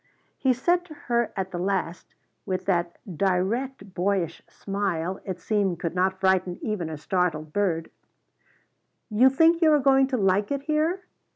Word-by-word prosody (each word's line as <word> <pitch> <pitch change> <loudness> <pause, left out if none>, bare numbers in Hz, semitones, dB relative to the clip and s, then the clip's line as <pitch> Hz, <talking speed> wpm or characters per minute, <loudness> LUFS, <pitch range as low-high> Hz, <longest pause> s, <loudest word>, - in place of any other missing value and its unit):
He 265 - +3
said 345 +8 +1
to 310 -4 -12
her 235 -4 -1
at 190 0 -3
the 175 - -4
last, 185 -2 -3 0.3
with 185 -2 -3
that 175 -3 0 0.2
direct 200 - -1
boyish 180 -3 -1
smile 190 -3 -3
it 185 -2 -5
seemed 195 -3 0
could 170 - -3
not 190 +1 0
frighten 190 -2 +1
even 205 -7 -2
a 155 - -5
startled 155 -2 -1
bird: 175 -5 0 1.2
"You 240 +5 +6
think 325 +5 +4
you 320 -2 +5
are 300 - +6
going 270 0 +4
to 260 -1 -1
like 195 0 +2
it 280 -1 -2
here?" 315 +5 0
195 Hz, 160 wpm, -25 LUFS, 180-260 Hz, 1.2 s, You